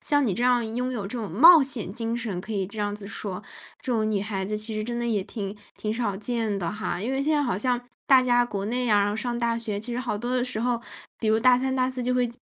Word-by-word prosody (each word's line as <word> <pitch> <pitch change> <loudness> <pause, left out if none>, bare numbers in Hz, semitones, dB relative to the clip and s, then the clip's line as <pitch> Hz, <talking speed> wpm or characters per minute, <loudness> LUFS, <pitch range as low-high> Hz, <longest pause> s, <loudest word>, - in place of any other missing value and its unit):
像 290 -2 +2
你 200 - 0
这 235 - -2
样 245 -2 +3
拥 250 +1 -1
有 235 -5 -3
这 200 +5 -5
种 215 -6 -4
冒 320 - +8
险 235 -8 -3
精 230 0 -2
神， 220 -7 -3
可 220 - -7
以 195 -3 -1
这 210 +3 -9
样 205 0 -1
子 205 - -4
说， 200 -1 -5 0.4
这 255 - -2
种 215 -1 +1
女 205 - 0
孩 195 -2 -3
子 210 +2 -2
其 215 +1 -1
实 215 - -2
真 235 +2 -3
的 240 - -1
也 215 -4 +1
挺 200 0 -6 0.2
挺 215 0 -2
少 225 -5 -1
见 220 -1 -1
的 175 0 -2
哈。 215 -4 -3
因 240 +6 -2
为 270 - 0
现 305 +2 +1
在 290 - +2
好 245 -8 0
像 245 +3 0 0.3
大 265 -2 +7
家 245 -1 +3
国 200 -4 -4
内 245 +4 -1
呀， 205 -2 +3
上 240 +2 -2
大 235 -1 0
学 220 -3 -2
其 240 +3 -5
实 245 - -2
好 235 -5 -2
多 240 +3 -2
的 250 - +2
时 250 -3 -2
候， 240 -1 0 0.4
比 220 - 0
如 220 - +4
大 250 +2 +5
三、 265 +1 -1
大 255 0 +2
四 255 -1 -2
就 250 +1 0
会 250 -1 +2
230 Hz, 305 characters per minute, -25 LUFS, 205-250 Hz, 0.4 s, 冒